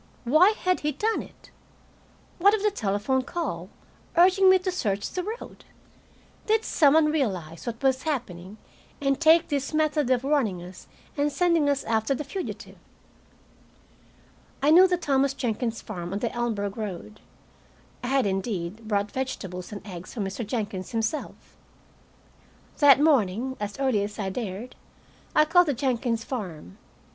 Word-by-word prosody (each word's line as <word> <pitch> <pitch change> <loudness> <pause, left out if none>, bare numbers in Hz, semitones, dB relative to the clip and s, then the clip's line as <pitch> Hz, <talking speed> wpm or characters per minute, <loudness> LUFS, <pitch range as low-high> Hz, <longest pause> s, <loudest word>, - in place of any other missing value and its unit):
Why 320 - +5
had 365 0 +2
he 300 0 -1
done 435 +11 0
it? - - -16 0.9
What 400 +4 +5
of 420 - -4
the 420 - +3
telephone 215 - 0
call, 255 - -4 0.5
urging 375 +2 +6
me 375 - +7
to 370 0 -3
search 205 - -2
the 365 - -2
road? 440 +6 -7 0.8
Did 440 +1 +2
some 290 -1 +4
one 310 -1 +4
realize 185 - -3
what 230 +2 -5
was 265 -1 +2
happening, 215 - -4 0.4
and 275 +1 0
take 330 +1 +5
this 285 0 -2
method 305 -3 +1
of 255 -1 +2
warning 270 -10 +1
us 180 +1 -12 0.3
and 290 0 0
sending 335 -2 +2
us 280 -1 0
after 225 +3 0
the 300 - -4
fugitive? 360 +7 -7 1.8
I 295 - +5
knew 365 +4 +8
the 360 -1 +1
Thomas 275 -4 +1
Jenkins 235 -2 -2
farm 175 -4 -6
on - - -1
the 230 +2 -2
Elmsburg 220 -4 -2
road. 210 0 -6 0.8
I - - -3
had, 270 -1 +2
indeed, 195 +1 -3
bought 205 -1 0
vegetables 190 -9 -5
and 205 -1 -8
eggs 180 -3 -9
from 210 -4 -2
Mr. 195 +5 -4
Jenkins 205 -2 -4
himself. 225 +6 -4 1.2
That 285 -2 +7
morning, 260 -4 +2
as 205 -1 -5
early 260 -6 +1
as 205 +1 -6
I 195 -2 -3
dared, 220 +2 -5 0.6
I 305 - +6
called 355 +2 +4
the 285 - 0
Jenkins 235 -3 -1
farm. 180 - -7
Mr. - - -32
255 Hz, 155 wpm, -26 LUFS, 205-305 Hz, 1.8 s, knew